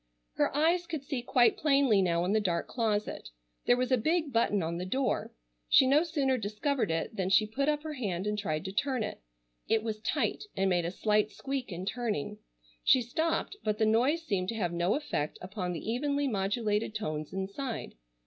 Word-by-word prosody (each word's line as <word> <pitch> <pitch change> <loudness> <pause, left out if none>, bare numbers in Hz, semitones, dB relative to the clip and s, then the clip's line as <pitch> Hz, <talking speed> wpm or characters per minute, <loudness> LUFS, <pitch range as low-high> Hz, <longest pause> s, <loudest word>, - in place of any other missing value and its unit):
Her - - +1
eyes 340 +3 +2
could 315 -5 -4
see 275 -3 -3
quite 245 0 +3
plainly 275 -8 +4
now 170 -1 +1
in 190 - +1
the 220 - +4
dark 175 -5 -1
closet. 215 -3 -2 0.4
There 245 - +5
was 255 +1 -1
a 255 - +4
big 315 +2 0
button 210 -4 +2
on 165 +1 -2
the 180 - -4
door. 260 +6 -1 0.4
She - - +7
no 280 +4 +5
sooner 280 -6 0
discovered 220 - -1
it 165 +6 -2
than 190 -2 -1
she 205 +3 +5
put 275 +7 -1
up 295 0 0
her 310 -1 -4
hand 200 -9 -3
and 210 0 0
tried 185 -5 -2
to 190 - -3
turn 255 +3 0
it. 210 - -6 0.5
It 225 -1 +2
was 220 -1 -3
tight 220 - -1
and 195 0 +2
made 175 -2 +2
a 170 - -2
slight 210 +2 +1
squeak 270 +1 -4
in 180 +1 -5
turning. 210 - -2 0.4
She 255 - +5
stopped 320 - -1
but 210 -1 0
the 220 - +2
noise 255 +10 +2
seemed 190 -7 -1
to 230 - -2
have 175 -6 -1
no 175 +3 +1
effect 280 - -2
upon 185 -1 -4
the 175 - -6
evenly 285 +3 0
modulated 210 0 -1
tones 155 -7 -3
inside. 200 +6 -4
220 Hz, 200 wpm, -30 LUFS, 190-275 Hz, 0.5 s, She